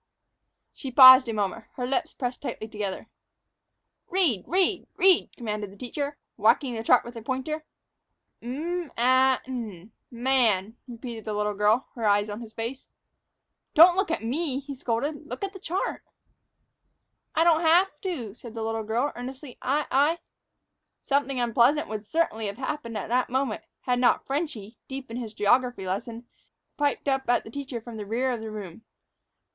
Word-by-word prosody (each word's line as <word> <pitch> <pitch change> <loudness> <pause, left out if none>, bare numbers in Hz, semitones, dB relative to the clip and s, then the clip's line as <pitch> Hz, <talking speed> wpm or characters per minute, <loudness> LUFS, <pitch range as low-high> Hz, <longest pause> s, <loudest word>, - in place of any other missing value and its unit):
'" - - -57 0.3
She 265 - -7
paused 260 0 +10
a - - -1
moment, 210 +1 -2
her 250 - -3
lips 315 +6 -1
pressed 245 -2 -4
tightly 220 -5 -5
together. 210 -3 -5 1.0
"Read, 325 - +2
read, 370 +1 +1
read!" 375 -2 +5
commanded 210 -4 -4
the 200 - -15
teacher, 280 +4 -4 0.2
whacking 265 -4 +3
the 225 - -3
chart 245 +2 +4
with 240 +1 -9
a - - -6
pointer. 270 +6 -3 0.8
"'M 325 +7 -4
a 260 +2 +4
n, 225 -7 -6 0.2
man,'" 235 -5 +1
repeated 235 -2 -8
the 215 -1 -3
little 210 0 0
girl, 210 +5 +2
her 235 - -7
eyes 205 +1 +2
on 210 +3 -6
his 225 -2 -9
face. 230 +4 -6 0.9
"Don't 345 +3 +9
look 385 0 +1
at 330 - -2
me," 270 +3 -1
he 280 0 -7
scolded; 280 +5 -3
"look - - -6
at 395 0 -3
the 385 - -10
chart." 365 +2 -3 1.3
"I 325 - +4
don't 335 -1 +4
haf' 335 -1 +3
to," 270 - -4
said 235 0 -11
the 225 - -3
little 225 0 -2
girl, 230 +6 -1
earnestly; 255 +2 -8
"I 290 +3 0
I 290 +5 +3 0.4
" - - -55
Something 275 -2 0
unpleasant 240 +5 +3
would 215 -1 -5
certainly 225 -9 0
have 200 +1 -5
happened 260 -4 -4
at 200 - -4
that 250 +1 +1
moment, 260 -3 -1 0.2
had 245 -1 0
not 245 - +3
"Frenchy," 270 - -4
deep 265 -2 -7
in 230 - -4
his 225 -3 -6
geography 245 -1 +2
lesson, 225 +5 -4 0.5
piped 290 -1 -1
up 270 -2 0
at 245 - +3
the 220 - -11
teacher 270 -2 -5
from 230 0 -9
the 210 - -5
rear 250 +5 0
of 235 -3 -3
the 220 - -6
room. 205 -3 -8
250 Hz, 175 wpm, -26 LUFS, 225-285 Hz, 1.3 s, paused